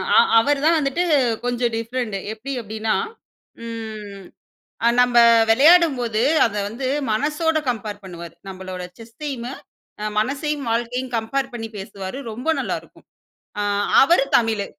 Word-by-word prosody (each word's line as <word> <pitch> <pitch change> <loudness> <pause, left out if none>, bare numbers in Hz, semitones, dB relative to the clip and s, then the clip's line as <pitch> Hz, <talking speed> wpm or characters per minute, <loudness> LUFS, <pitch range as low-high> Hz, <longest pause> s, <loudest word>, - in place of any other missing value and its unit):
அ, - - +7 0.2
அவரு 280 +4 +1
தான் 330 +1 +5
வந்துட்டு 285 +4 0 0.4
கொஞ்சம் 245 -1 0
டிஃபரண்ட். 230 -1 -3 0.2
எப்பிடி 255 +6 -6
அப்பிடீன்னா, 220 0 -2 0.7
ம் 215 -3 -7 0.6
அ - - +6
நம்ப 245 -1 +3 0.3
விளையாடும்போது, 265 -4 +4 0.2
அத 215 -2 -2
வந்து 250 +5 -4 0.2
மனசோட 305 +7 0
கம்பேர் 210 -3 -4
பண்ணுவாரு. 170 -3 -9 0.2
நம்பளோட 185 -1 -7 0.2
செஸ்சையுமே, 240 +2 -6 0.7
மனசையும் 280 +4 -2
வாழ்க்கையும் 240 +2 -2
கம்பேர் 250 +4 -2
பண்ணி 225 -1 -5
பேசுவாரு. 195 +3 -7
ரொம்ப 245 +7 -7
நல்லாருக்கும். - - -6 0.5
அ - - 0 0.4
அவரு 275 -1 +4
தமிழு. 220 -3 0
235 Hz, 120 wpm, -21 LUFS, 215-270 Hz, 0.7 s, அ